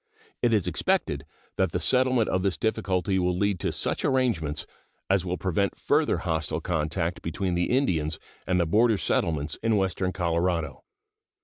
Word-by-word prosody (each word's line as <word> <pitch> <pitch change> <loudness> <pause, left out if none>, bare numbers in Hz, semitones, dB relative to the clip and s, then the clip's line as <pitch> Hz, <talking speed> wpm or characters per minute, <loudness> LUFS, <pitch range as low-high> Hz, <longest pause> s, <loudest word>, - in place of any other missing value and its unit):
It 120 - +3
is 105 -5 +2
expected - - 0 0.3
that - - +1
the - - 0
settlement 130 -3 +3
of 95 - 0
this 95 -1 0
difficulty 100 -4 0
will 90 0 +1
lead 100 -1 +1
to - - -1
such - - -1
arrangements 95 - 0 0.5
as 95 -2 +3
will 90 0 -2
prevent 95 +1 0
further - - +2
hostile 80 -1 -2
contact 80 +1 -1
between 90 +3 -2
the 90 0 0
Indians 85 - +1 0.3
and 90 -1 +2
the 85 - +3
border 110 +6 +3
settlements 80 -5 -1
in 115 -1 +2
western 95 -1 0
Colorado. 85 -2 -1
90 Hz, 155 wpm, -26 LUFS, 85-105 Hz, 0.5 s, It